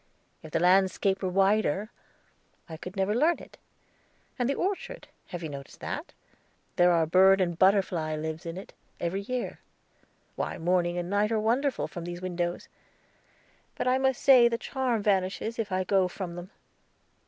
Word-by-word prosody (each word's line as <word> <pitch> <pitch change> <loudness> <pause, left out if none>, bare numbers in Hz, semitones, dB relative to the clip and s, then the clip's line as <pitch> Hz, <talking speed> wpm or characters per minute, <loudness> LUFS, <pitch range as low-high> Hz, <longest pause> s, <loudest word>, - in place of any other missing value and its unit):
If 155 - -10
the 165 - 0
landscape 190 +2 +3
were 190 - -1
wider, 195 +1 +1 0.8
I 165 - -7
could 180 +4 -9
never 195 +1 0
learn 310 +9 +3
it. - - -15 0.8
And 245 +1 +1
the 280 - +1
orchard 405 +6 -3 0.2
have 175 -1 -7
you 160 - -4
noticed 140 -1 -9
that? - - -5 0.6
There 175 0 +5
are 165 -2 +3
bird 190 +4 +5
and 175 -2 0
butterfly 185 -5 +2
lives 160 +2 -5
in 165 +2 -5
it, 190 - -10 0.3
every 175 +3 -2
year. 250 +4 -4 0.8
Why, - - -3
morning 175 0 +1
and 175 0 -3
night 205 +3 +1
are 220 - +1
wonderful 250 +6 0
from 175 -2 -7
these 175 0 -6
windows. 175 -1 -3 1.1
But - - -2
I 255 +1 +3
must 265 -1 0
say 255 -3 +7
the 235 -1 -1
charm 250 -4 -2
vanishes 200 +3 0
if 215 -3 -2
I 185 0 0
go 190 0 +2
from 180 -1 -6
them. 175 +1 -8
190 Hz, 165 wpm, -28 LUFS, 175-220 Hz, 1.1 s, say